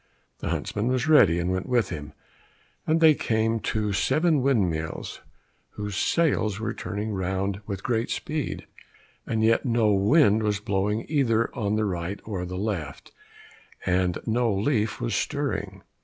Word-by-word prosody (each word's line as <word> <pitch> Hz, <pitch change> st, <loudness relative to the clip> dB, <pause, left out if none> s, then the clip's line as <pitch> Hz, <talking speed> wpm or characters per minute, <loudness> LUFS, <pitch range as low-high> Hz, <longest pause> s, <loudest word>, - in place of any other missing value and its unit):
The -, -, -4 dB
huntsman 105 Hz, +3 st, -2 dB
was 130 Hz, +2 st, 0 dB
ready, 150 Hz, -, +6 dB
and 90 Hz, +1 st, -1 dB
went 95 Hz, 0 st, -3 dB
with 120 Hz, -4 st, +2 dB
him, 75 Hz, -4 st, -7 dB, 0.7 s
and 160 Hz, +1 st, +3 dB
they 160 Hz, -1 st, +8 dB
came 115 Hz, -3 st, 0 dB
to 105 Hz, -2 st, -1 dB
seven 155 Hz, -, +2 dB
windmills 90 Hz, -12 st, -1 dB, 0.5 s
whose 105 Hz, -1 st, -5 dB
sails 110 Hz, -, +1 dB
were 115 Hz, 0 st, -2 dB
turning 105 Hz, +4 st, -4 dB
round 95 Hz, +1 st, -2 dB
with 100 Hz, -2 st, -5 dB
great 115 Hz, -2 st, 0 dB
speed, 150 Hz, -2 st, -3 dB, 0.6 s
and 110 Hz, -1 st, 0 dB
yet 115 Hz, +1 st, +3 dB
no 115 Hz, -4 st, +2 dB
wind 105 Hz, +2 st, +4 dB
was 105 Hz, -2 st, 0 dB
blowing 105 Hz, +1 st, -1 dB
either 115 Hz, -7 st, +1 dB
on 105 Hz, -3 st, 0 dB
the 110 Hz, 0 st, +1 dB
right 90 Hz, 0 st, -3 dB
or 95 Hz, -5 st, -4 dB
the 90 Hz, +1 st, -5 dB
left, 95 Hz, -7 st, -4 dB, 0.7 s
and 90 Hz, -1 st, +1 dB
no 115 Hz, 0 st, +1 dB
leaf 105 Hz, +2 st, 0 dB
was -, -, -2 dB
stirring. -, -, -2 dB
105 Hz, 150 wpm, -26 LUFS, 95-120 Hz, 0.7 s, they